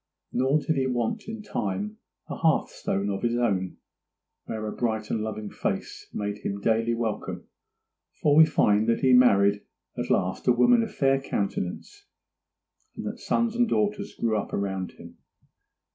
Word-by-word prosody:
Nor 130 Hz, +4 st, +3 dB
did 155 Hz, 0 st, -1 dB
he 130 Hz, -1 st, +1 dB
want 125 Hz, -, -2 dB
in 220 Hz, -1 st, -6 dB
time 105 Hz, -, -3 dB, 0.3 s
a -, -, -5 dB
hearthstone 100 Hz, +1 st, 0 dB
of 95 Hz, -, -3 dB
his 120 Hz, 0 st, 0 dB
own, 95 Hz, -7 st, 0 dB, 0.7 s
where 110 Hz, -1 st, -4 dB
a 105 Hz, -, -3 dB
bright 110 Hz, -3 st, -2 dB
and 110 Hz, -, 0 dB
loving 110 Hz, -1 st, -5 dB
face -, -, -4 dB
made 105 Hz, 0 st, -3 dB
him 100 Hz, -1 st, -4 dB
daily 115 Hz, +2 st, +1 dB
welcome; 115 Hz, -2 st, -4 dB, 0.7 s
for 145 Hz, -1 st, +3 dB
we 160 Hz, -, +9 dB
find 105 Hz, -7 st, +3 dB
that 115 Hz, -, +1 dB
he 130 Hz, -1 st, +4 dB
married 100 Hz, -5 st, +5 dB, 0.3 s
at -, -, -4 dB
last -, -, 0 dB
a 125 Hz, -, +6 dB
woman 230 Hz, -, +5 dB
of 225 Hz, -, -2 dB
a -, -, -14 dB
fair 135 Hz, -1 st, +2 dB
countenance, 100 Hz, -, -4 dB, 0.9 s
and -, -, -6 dB
that -, -, -5 dB
sons 235 Hz, -1 st, 0 dB
and 240 Hz, -1 st, +2 dB
daughters 205 Hz, -1 st, -1 dB
grew 115 Hz, -2 st, 0 dB
up 105 Hz, -, -3 dB
around 95 Hz, -2 st, -2 dB
him. -, -, -14 dB
115 Hz, 165 wpm, -26 LUFS, 105-145 Hz, 0.9 s, we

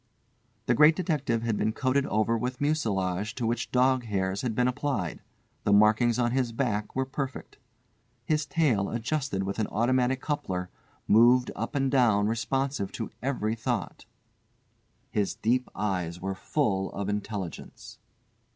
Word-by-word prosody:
The 120 Hz, -, +3 dB
Great 150 Hz, +6 st, +6 dB
Detective 145 Hz, -10 st, -1 dB
had 115 Hz, -3 st, 0 dB
been 110 Hz, -, 0 dB
coated 135 Hz, +2 st, +1 dB
over 110 Hz, +2 st, +1 dB
with 125 Hz, +2 st, -3 dB
mucilage 105 Hz, -, -1 dB
to 120 Hz, -, -2 dB
which 115 Hz, +2 st, -1 dB
dog 130 Hz, 0 st, +3 dB
hairs 95 Hz, -2 st, -1 dB
had 120 Hz, -4 st, -2 dB
been 125 Hz, +1 st, +2 dB
applied. 125 Hz, -, -2 dB, 0.4 s
The -, -, +1 dB
markings 110 Hz, +3 st, +4 dB
on 120 Hz, -1 st, +1 dB
his 125 Hz, -2 st, 0 dB
back 110 Hz, -4 st, -2 dB
were 130 Hz, 0 st, +1 dB
perfect. 135 Hz, 0 st, -6 dB, 0.7 s
His 150 Hz, +1 st, 0 dB
tail, 135 Hz, -10 st, +1 dB
adjusted 120 Hz, -3 st, -2 dB
with 100 Hz, +3 st, -3 dB
an 110 Hz, -, 0 dB
automatic 125 Hz, +3 st, +1 dB
coupler, 95 Hz, -12 st, -3 dB, 0.4 s
moved 120 Hz, +3 st, +5 dB
up -, -, -4 dB
and 135 Hz, -1 st, +1 dB
down 115 Hz, -7 st, +4 dB
responsive 130 Hz, 0 st, -1 dB
to 115 Hz, -, -5 dB
every 125 Hz, -5 st, -1 dB
thought. 115 Hz, -3 st, -3 dB, 1.1 s
His 100 Hz, -2 st, 0 dB
deep 125 Hz, +3 st, 0 dB
eyes 90 Hz, -4 st, -2 dB
were 95 Hz, +1 st, -3 dB
full 95 Hz, -1 st, -1 dB
of 100 Hz, -1 st, -3 dB
intelligence. 105 Hz, -3 st, -5 dB
115 Hz, 145 wpm, -28 LUFS, 105-130 Hz, 1.1 s, Great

